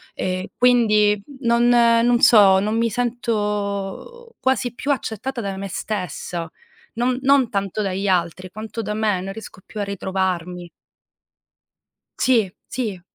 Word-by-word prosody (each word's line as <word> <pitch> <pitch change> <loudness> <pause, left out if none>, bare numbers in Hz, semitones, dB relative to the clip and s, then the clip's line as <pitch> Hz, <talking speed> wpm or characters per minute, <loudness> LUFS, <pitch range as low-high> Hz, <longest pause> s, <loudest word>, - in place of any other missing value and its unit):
Ehm, 185 0 -2
quindi 215 -4 +4 0.2
non 235 -1 +3
non 235 0 +4
so, 205 -6 +7
non 210 +3 -1
mi 230 0 +1
sento 220 - -3
quasi 260 -2 0
più 280 +4 -2
accettata 250 -1 -3
da 195 -2 -4
me 195 +1 -5
stessa, 180 -4 -4 0.5
non 250 +2 0
non 270 -3 +4
tanto 200 0 -2
dagli 195 0 -2
altri 185 0 0
quanto 220 +2 -6
da 210 -1 -3
me. 210 -3 0
Non 195 +1 -5
riesco 220 -3 -10
più 215 - -6
a - - 0
ritrovarmi. 185 -3 -3 1.5
Sì, 230 -7 +2 0.2
sì. 215 -8 -3
210 Hz, 130 wpm, -21 LUFS, 195-240 Hz, 1.5 s, so